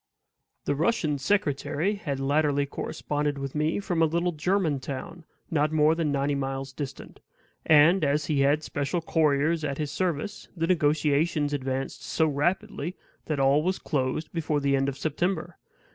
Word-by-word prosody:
The - - +1
Russian 155 -2 0
secretary 160 +2 0
had 150 -10 -4
latterly 145 +1 +2
corresponded 145 +1 -3
with 135 -1 -5
me 155 +4 0
from 175 -4 -1
a 160 - +5
little 170 +3 0
German 160 -2 0
town, 140 +5 -7 0.3
not 150 -1 +2
more 155 0 +4
than 165 -3 0
ninety 140 +1 0
miles 135 -1 -3
distant; 140 -1 -7 0.5
and, 160 +4 +6
as 145 +1 +1
he 150 -2 0
had 145 +3 +3
special 145 +4 -2
couriers 155 0 +2
at 140 -2 -2
his 150 -2 -3
service, 180 +2 -2
the 165 - +1
negotiations 150 -2 +2
advanced 135 -1 -3
so 160 - +1
rapidly 175 +3 -1 0.3
that 155 -3 -1
all 135 +2 +4
was 185 +4 0
closed 145 +1 -2
before 155 -3 0
the 140 -1 +2
end 135 0 +1
of 135 - -6
September. 175 +6 -2
150 Hz, 160 wpm, -27 LUFS, 140-165 Hz, 0.5 s, and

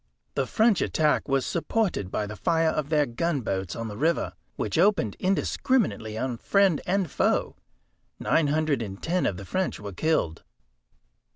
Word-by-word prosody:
The 135 - -1
French 220 - +3
attack 155 -1 +1
was 135 -2 +1
supported 175 - -1
by 105 - -2
the 105 +1 -7
fire 165 +4 +2
of 150 -2 -2
their 150 -2 +3
gunboats 115 - -2
on 115 0 -4
the 105 - -6
river, 160 +9 0 0.2
which 105 - -1
opened 180 - +3
indiscriminately 185 - 0
on 125 0 -2
friend 195 -6 +3
and 190 0 +1
foe. - - +1 0.6
Nine 160 -3 +2
hundred 150 -3 +1
and 100 -3 -6
ten 180 +2 0
of 90 - -2
the 100 - -8
French 185 - -2
were 100 -1 -7
killed." 90 - 0
150 Hz, 160 wpm, -26 LUFS, 110-175 Hz, 0.6 s, French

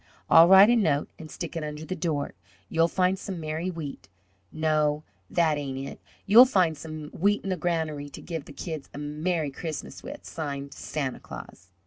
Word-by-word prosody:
I'll 165 +1 +9
write 190 +4 +9
a - - +5
note 155 -11 +2
and 155 - -9
stick 170 0 -6
it 165 - -2
under 150 +1 -5
the 185 - -3
door, 155 -6 -2 0.4
'You'll 165 0 +3
find 185 +2 +1
some 190 -3 -5
merry 160 +3 -3
wheat 150 - -7 0.4
'No, 155 -1 +1 0.3
that 160 -3 +2
ain't 135 -2 -4
it. - - -10 0.2
'You'll 235 +5 +9
find 180 -9 +2
some 155 0 -7
wheat 205 +4 +1
in 195 - -2
the - - +1
granary 160 -5 -2
to 140 - -10
give 165 -4 -5
the - - -11
kids 160 -5 -6
a - - -6
merry 150 +1 -2
Christmas 155 +2 -6
with,' 290 +2 -9
signed, 140 -3 -5
'Santa 140 -4 -4
Claus.'" - - -11
160 Hz, 185 wpm, -27 LUFS, 150-180 Hz, 0.4 s, I'll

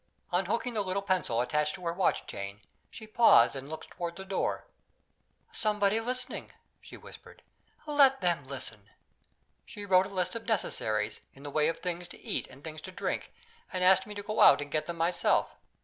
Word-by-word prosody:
Unhooking 200 +7 0
the 215 - 0
little 195 0 -2
pencil 185 - 0
attached 150 +4 0
to 180 - -10
her 170 - 0
watch 185 +1 +1
chain, 100 +1 -7 0.3
she 220 - -10
paused 215 - +5
and 135 +1 -7
looked 160 - -8
toward 170 -1 -5
the 190 - -8
door. 195 0 -2 0.9
"Somebody 210 0 +2
listening," 250 +2 -3 0.3
she - - -12
whispered. - - -14 0.4
"Let 280 -3 +5
them 175 -5 +1
listen." 110 -6 -4 0.7
She 205 - -9
wrote 190 -1 +4
a - - -11
list 185 -2 -2
of 230 -1 -7
necessaries, 110 - -1 0.2
in 135 - -14
the 145 - -6
way 150 +1 +2
of 165 - -2
things 175 -1 -4
to - - -12
eat - - -3
and 135 +2 -16
things 155 -1 -8
to 185 - -9
drink, - - -3 0.4
and 185 -1 -2
asked 190 +1 +5
me 210 - -8
to 205 - -6
go 215 +1 -1
out - - +8
and 145 -1 -6
get 155 - -1
them 170 -1 -5
myself. 170 +2 +1
180 Hz, 190 wpm, -30 LUFS, 150-205 Hz, 0.9 s, out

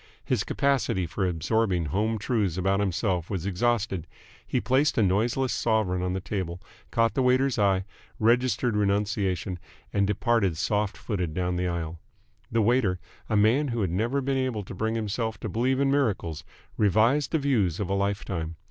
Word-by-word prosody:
His - - +1
capacity 135 -9 +1
for 95 +3 -1
absorbing 90 +1 0
home 105 +9 0
truths 105 -5 0
about 95 +1 +1
himself 90 -2 -1
was 95 -4 -3
exhausted. 100 -3 0 0.4
He - - 0
placed 135 +7 +2
a 110 - +4
noiseless 115 +7 +1
sovereign 110 -6 +1
on 90 0 -1
the 95 - -1
table, 90 -3 -4 0.3
caught 115 -1 +2
the 135 - +1
waiter's 130 0 +2
eye, 95 -2 +2 0.3
registered 120 +1 +2
renunciation, 100 -3 0 0.3
and 100 -1 +2
departed 105 -4 +1
soft 105 +3 0
footed 90 -8 -3
down 90 0 -1
the 90 +1 -1
aisle. 85 -2 -3 0.5
The 115 -1 +2
waiter, 105 -5 +2 0.3
a 110 - +2
man 115 +8 +3
who 120 -3 -2
had 95 -4 0
never 115 +9 0
been 135 0 0
able 130 -5 -1
to 90 - -9
bring 110 +4 -1
himself 110 +1 -2
to 110 - -3
believe 125 +6 +1
in 140 -1 +2
miracles, 105 - 0 0.3
revised 110 +8 +3
the 160 - +2
views 115 - +1
of 100 - -1
a 95 - -1
life 100 0 -1
time. 85 -3 -4
105 Hz, 175 wpm, -27 LUFS, 90-120 Hz, 0.5 s, a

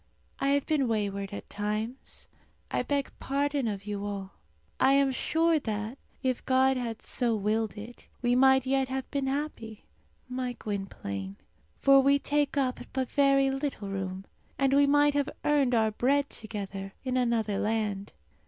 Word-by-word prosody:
I 275 - 0
have 285 -1 +1
been 295 -5 +1
wayward 200 -3 -1
at 200 - -7
times; 215 +5 -4 0.4
I - - +1
beg 280 -1 -1
pardon 280 -1 0
of 200 -2 -4
you 205 -1 -4
all. 200 -2 -5 0.5
I 265 - +5
am 275 -1 +4
sure 325 +4 +2
that, 220 0 -4 0.2
if 255 -2 0
God 265 0 +4
had 235 -3 -4
so 240 -3 0
willed 215 +1 -1
it, 225 +4 -10
we 245 0 +1
might 265 +1 +5
yet 270 0 +1
have 265 0 -3
been 280 -2 -1
happy, 265 -6 -4 0.4
my 250 -1 -3
Gwynplaine; 100 - -5 0.4
for 275 0 +6
we 280 +1 +4
take 290 0 0
up 260 -2 +1
but 260 -1 -2
very 275 -1 +4
little 270 -7 -3
room, 190 -1 -4 0.3
and 275 0 +2
we 285 0 +5
might 290 0 +4
have 285 -1 0 0.2
earned 280 -4 +3
our 220 -1 +3
bread 280 +6 +1
together 195 -3 -6
in 255 0 -1
another 230 -5 +1
land. 210 -2 -1
250 Hz, 160 wpm, -29 LUFS, 210-275 Hz, 0.5 s, for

